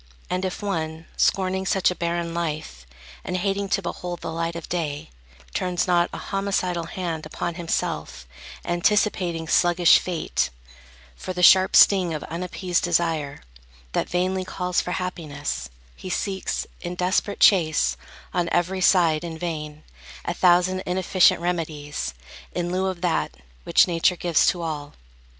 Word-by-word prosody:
And 180 +1 -1
if 185 +2 -4
one, 160 -4 -3
scorning 190 0 +1
such 190 -1 +2
a - - -4
barren 170 -1 -2
life, 150 - -4 0.4
And 180 - -2
hating 195 +2 -1
to 195 - 0
behold 175 0 -5
the - - -4
light 165 0 -2
of 170 - -6
day, 150 - -3 0.4
Turns 180 -1 0
not 175 -1 +2
a - - -6
homicidal 190 -4 -1
hand 165 -3 -4
upon 170 +2 -4
Himself, 165 - -3 0.4
anticipating 175 -2 +1
sluggish 175 0 +5
Fate, 175 -3 -1 0.7
For 185 - -6
the 180 0 -2
sharp 185 +1 +7
sting 185 -5 +6
of 150 - -5
unappeased 180 +1 -2
desire, 165 -4 0 0.5
That - - -1
vainly 185 +1 0
calls 180 -1 -1
for 180 - -4
happiness, 145 - -4 0.3
he 185 - -8
seeks, 190 +1 -2 0.2
In 175 0 -5
desperate 185 +3 0
chase, 165 -6 +4 0.4
on 175 -2 0
every 185 +2 0
side, 170 -4 +4
in 165 -2 -5
vain, 155 -3 -5 0.4
A - - -1
thousand 180 +1 +3
inefficient 185 -1 +3
remedies, 155 - -3 0.4
In 175 0 -2
lieu 190 +1 0
of 185 -2 -4
that, 175 -2 0 0.3
which - - +5
Nature 175 +1 +2
gives 175 -2 +2
to 175 -2 +1
all. 150 -3 -5
175 Hz, 145 wpm, -24 LUFS, 165-185 Hz, 0.7 s, sharp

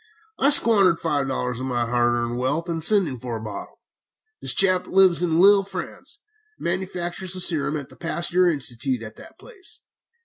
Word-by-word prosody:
I 275 - +3
squandered 200 - +4
five 145 -4 -2
dollars 125 -2 -3
of 130 - -5
my 120 -2 -1
hard 120 0 0
earned 120 0 -3
wealth 145 +7 -2
in 165 -1 -4
sending 165 - +2
for 120 -1 -5
a - - -8
bottle. 110 -2 -9 0.6
This - - +2
chap 185 -2 +4
lives 185 -2 +3
at 175 - 0
Lille, 195 +5 +5
France, 200 - -9 0.3
and - - -11
manufactures 180 0 -3
his 185 - +5
serum 155 -2 -1
at 140 -3 -9
the - - -16
Pasteur 175 +1 0
Institute 130 -4 -3
at 110 0 -10
that - - -15
place. 405 -6 -9
165 Hz, 180 wpm, -22 LUFS, 125-185 Hz, 0.6 s, Lille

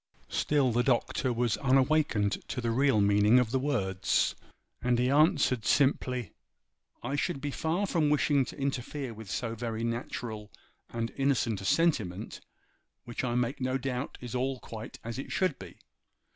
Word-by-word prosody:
Still 140 -4 +2
the 120 +2 +2
Doctor 125 +1 +1
was 120 -2 0
unawakened 135 -6 +2
to - - -4
the 120 -1 -1
real 135 -1 +3
meaning 105 +3 +5
of 125 -3 +2
the 130 - +1
words, 100 -10 +1 0.5
and 125 -1 +2
he 125 +2 +2
answered, 140 -5 +3
simply,— 125 -4 +1 0.7
'I 135 +4 -2
should 145 +1 -1
be 145 +1 -3
far 165 +8 -1
from 165 -6 +1
wishing 145 -1 +3
to - - -9
interfere 135 -1 -3
with 110 -2 -10
so 115 +2 -2
very 115 -1 -4
natural 115 -2 -4 0.4
and 115 0 -3
innocent 130 -7 +1
a - - -7
sentiment, 110 - 0 0.6
which 120 +2 -4
I 120 -2 -1
make 125 +3 -1
no 130 +1 0
doubt 130 0 -4
is 125 -1 -7
all 130 +1 -1
quite 110 -1 -8
as 115 +2 -5
it - - -6
should 185 -7 0
be. - - -11
125 Hz, 160 wpm, -29 LUFS, 115-140 Hz, 0.7 s, meaning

